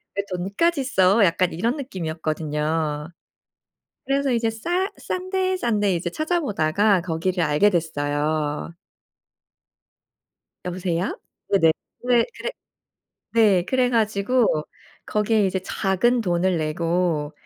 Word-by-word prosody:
왜 200 Hz, -, 0 dB
돈까지 235 Hz, -, 0 dB
써?' 205 Hz, -5 st, +4 dB
약간 180 Hz, -1 st, +2 dB
이런 230 Hz, -, 0 dB
느낌이었거든요. 155 Hz, -, -2 dB, 1.0 s
그래서 275 Hz, -1 st, +1 dB
이제 230 Hz, -1 st, +1 dB
싸 350 Hz, -, -1 dB
싼 370 Hz, 0 st, -4 dB
데, 375 Hz, 0 st, +1 dB
싼 235 Hz, -, 0 dB
데 200 Hz, -3 st, +2 dB
이제 175 Hz, +1 st, -2 dB
찾아 315 Hz, -, -1 dB
보다가 200 Hz, -, +2 dB
거기를 175 Hz, +1 st, -1 dB
알게 150 Hz, +7 st, +3 dB
됐어요. 150 Hz, -2 st, -1 dB, 1.9 s
여보세요? 180 Hz, 0 st, -2 dB, 0.3 s
네네. 165 Hz, -5 st, +5 dB, 0.4 s
네 240 Hz, -1 st, +5 dB
그래 -, -, -3 dB, 0.8 s
네 205 Hz, -6 st, +4 dB
그래 250 Hz, +2 st, +1 dB
가지고 220 Hz, +1 st, +2 dB, 0.6 s
거기에 210 Hz, -1 st, +2 dB
이제 190 Hz, 0 st, -1 dB
작은 195 Hz, +6 st, +1 dB
돈을 175 Hz, -2 st, +1 dB
내고 160 Hz, -1 st, -1 dB
190 Hz, 230 characters per minute, -23 LUFS, 165-235 Hz, 1.9 s, 네네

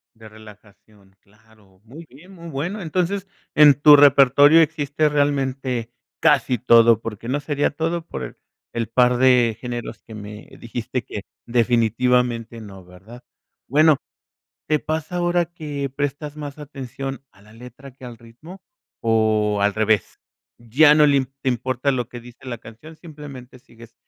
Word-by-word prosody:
De 110 Hz, -1 st, -14 dB
relajación, 105 Hz, -2 st, -19 dB
claro, 105 Hz, -2 st, -26 dB
muy 140 Hz, +9 st, -13 dB
bien, 160 Hz, +9 st, -17 dB
muy 170 Hz, -2 st, -12 dB
bueno. 170 Hz, +9 st, -4 dB
Entonces, 185 Hz, +3 st, -2 dB, 0.3 s
en 150 Hz, -1 st, +7 dB
tu 145 Hz, +2 st, +7 dB
repertorio 145 Hz, +2 st, +6 dB
existe, 150 Hz, -1 st, 0 dB
realmente, 135 Hz, -4 st, -1 dB, 0.3 s
casi 125 Hz, -4 st, +2 dB
todo, 115 Hz, -2 st, +5 dB
porque 115 Hz, 0 st, -7 dB
no 135 Hz, +4 st, -1 dB
sería 145 Hz, 0 st, -1 dB
todo 165 Hz, +2 st, -3 dB
por -, -, -8 dB, 0.4 s
el 115 Hz, -1 st, -3 dB
par 125 Hz, +1 st, +3 dB
de 125 Hz, -3 st, +3 dB
géneros 120 Hz, -3 st, -7 dB
que 110 Hz, -, -13 dB
me 105 Hz, 0 st, -10 dB
dijiste 120 Hz, +1 st, -5 dB
que 105 Hz, -, -7 dB, 0.3 s
definitivamente, 120 Hz, 0 st, 0 dB
no, 95 Hz, -3 st, -12 dB
¿verdad? 100 Hz, +8 st, -15 dB, 0.4 s
Bueno, 155 Hz, +1 st, +4 dB, 0.7 s
¿te 155 Hz, -1 st, +1 dB
pasa 160 Hz, +2 st, -4 dB
ahora 175 Hz, 0 st, +1 dB
que 150 Hz, -5 st, -6 dB
prestas 145 Hz, +1 st, -4 dB
más 145 Hz, -1 st, -8 dB
atención 135 Hz, -2 st, -7 dB
a 100 Hz, -, -24 dB
la 105 Hz, +2 st, -19 dB
letra 125 Hz, +4 st, -13 dB
que 130 Hz, 0 st, -16 dB
al 120 Hz, -2 st, -10 dB
ritmo 155 Hz, -, -14 dB, 0.4 s
o 110 Hz, -2 st, +1 dB
al 100 Hz, 0 st, +1 dB
revés? 110 Hz, -2 st, 0 dB, 0.4 s
Ya 145 Hz, +6 st, +4 dB
no 150 Hz, -, +5 dB
le 140 Hz, -2 st, +2 dB, 0.2 s
te 135 Hz, -, -2 dB
importa 130 Hz, +3 st, -1 dB
lo 125 Hz, -3 st, -3 dB
que 125 Hz, -, -9 dB
dice 120 Hz, +2 st, -16 dB
la 120 Hz, -2 st, -5 dB
canción, 115 Hz, +9 st, -14 dB
simplemente, 140 Hz, -7 st, -12 dB
sigues 115 Hz, -1 st, -18 dB
125 Hz, 150 wpm, -21 LUFS, 115-145 Hz, 0.7 s, en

